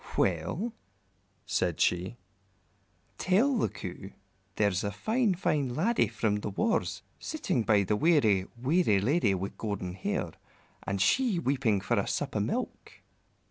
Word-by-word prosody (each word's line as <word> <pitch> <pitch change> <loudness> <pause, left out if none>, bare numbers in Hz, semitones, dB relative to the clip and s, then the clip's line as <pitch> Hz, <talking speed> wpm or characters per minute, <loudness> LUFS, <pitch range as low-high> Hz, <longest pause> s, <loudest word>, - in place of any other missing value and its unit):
"Well," 100 - 0 0.7
said - - 0
she, 90 +6 +1 1.0
"tell 225 +10 +3
the - - +1
Coo 95 -3 -8 0.4
there's 100 -4 +1
a 100 - 0
fine, 215 - +1
fine 145 -8 0
laddie 220 - +2
from 105 -2 0
the 105 - -4
wars 225 - -1 0.2
sitting 300 - -1
by 105 -3 +3
the 100 +2 0
weary, 110 - +3
weary 130 - +3
lady 110 - +2
with 95 +2 -5
golden 100 -4 -3
hair, 95 - -2 0.5
and 100 0 -3
she 235 - +3
weeping 130 - +1
for - - +1
a - - -1
sup - - -2
o' - - +2
milk." - - -3
110 Hz, 140 wpm, -29 LUFS, -, 1.0 s, tell